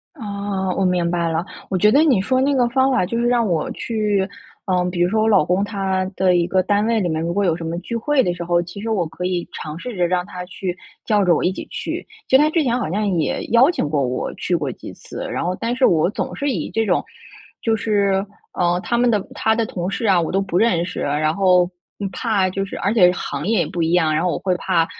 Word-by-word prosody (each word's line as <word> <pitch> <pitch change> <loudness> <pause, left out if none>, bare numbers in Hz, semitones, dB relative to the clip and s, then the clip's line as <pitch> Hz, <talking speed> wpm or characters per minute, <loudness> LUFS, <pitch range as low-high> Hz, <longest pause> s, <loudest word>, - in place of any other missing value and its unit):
啊， 200 - -3
我 195 - 0
明 180 -2 +1
白 170 -1 0
了。 165 +2 -1 0.2
我 190 - 0
觉 210 +4 +4
得 290 +6 +5
你 270 -10 +4
说 255 +6 +1
那 280 +2 +2
个 250 -3 +3
方 265 +2 +2
法 245 -8 +2
就 230 - -3
是 240 - +1
让 240 -2 +2
我 165 -5 -1
去， 210 -4 -1 0.4
呃， 180 -1 +1
比 175 - -4
如 175 - +3
说 215 +2 +1
我 220 - +2
老 195 -7 +5
公 180 +3 +1
他 195 -2 -1
的 185 -1 +3
一 175 -1 +2
个 185 +1 +2
单 205 +2 +1
位 230 -1 +2
里 185 - 0
面 160 -1 -1
如 170 +1 -2
果 200 +2 +1
有 165 -3 +2
什 170 - -7
么 165 +1 -3
聚 235 - -6
会 270 +4 +2
的 180 -7 0
时 175 0 -6
候， 175 0 +2
其 175 +4 -8
实 225 - -4
我 195 -6 +1
可 180 - -8
以 180 -1 -2
尝 155 0 -6
试 245 +3 -6
着 180 -2 +1
让 180 0 0
他 180 -2 -7
去 185 0 -5 0.3
叫 210 -2 +2
着 180 -2 +4
我 - - 0
一 180 - +2
起 - - -7
去。 - - -5 0.2
其 - - +4
实 270 - +7
他 305 - +3
之 325 0 +1
前 245 -3 +1
好 245 - -2
像 210 +3 0
也 150 -4 -1
邀 245 +7 +6
请 155 - -2
过 145 -3 +1
我 125 +1 -3
去 - - -3
过 - - -1
几 - - -10
次， - - -8
然 - - -2
后 180 +1 -1
但 230 +4 -2
是 260 0 +3
我 160 0 +3
总 205 - -4
是 285 0 -1
以 - - -3
这 225 0 0
种， 180 -4 +1 0.6
就 225 - +1
是， 200 -2 +1 0.3
呃， 175 0 +1
他 235 - 0
们 245 0 +3
的 215 -3 +2
他 220 0 +1
的 230 - 0
同 180 -3 -4
事 225 +3 -3
啊 190 -3 +4
我 165 - -1
都 195 - +1
不 190 -3 -1
认 180 -6 +2
识， 185 - -6
然 155 +2 0
后 180 -1 +3 0.4
怕 200 -5 0
就 195 +1 -2
是 195 - -8
而 200 +3 0
且 180 -6 +6
行 150 -3 -4
业 220 -2 +2
也 165 - +1
不 170 - -3
一 165 +1 +1
样， 160 -3 +3
然 155 - +1
后 180 - +1
我 - - -2
会 185 - 0
怕 175 -3 +1
190 Hz, 290 characters per minute, -20 LUFS, 175-225 Hz, 0.6 s, 实